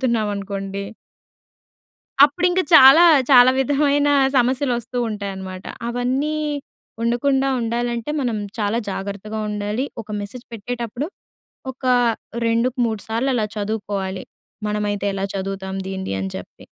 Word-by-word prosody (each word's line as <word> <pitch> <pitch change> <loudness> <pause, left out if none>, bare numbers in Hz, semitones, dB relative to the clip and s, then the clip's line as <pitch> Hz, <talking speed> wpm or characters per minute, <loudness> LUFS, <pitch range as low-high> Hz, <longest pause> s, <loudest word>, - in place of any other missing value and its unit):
పంపుతున్నామనుకోండి. 200 -4 -2 1.4
అప్పుడింక 355 +5 +2
చాలా 270 +6 +9 0.3
చాలా 250 -1 +8
విధమైన 285 +1 +2 0.3
సమస్యలొస్తూ 250 -1 0
ఉంటాయన్నమాట. 190 -3 -6 0.2
అవన్నీ 255 +5 -1 0.7
ఉండకుండా, 265 +4 +1
ఉండాలంటే 235 +2 -2
మనం 240 -4 -1 0.2
చాలా 210 +1 0
జాగ్రత్తగా 200 +3 -5
ఉండాలి. 210 +4 -2 0.2
ఒక 215 - -25
మెసేజ్ 205 +5 -8
పెట్టేటప్పుడు 240 +4 -4 0.7
ఒక 260 +1 -24 0.6
రెండు‌కు 230 +2 +1
మూడు 220 -3 -2
సార్లలా 230 0 0
చదువుకోవాలి. 200 -3 -3 0.4
మనమైతే 210 -1 -2
ఎలా 195 0 -1
చదువుతాం 190 0 -4
దీనిది 190 - -4
అని 95 0 -3
చెప్పి. - - -12
230 Hz, 100 wpm, -21 LUFS, 200-255 Hz, 1.4 s, చాలా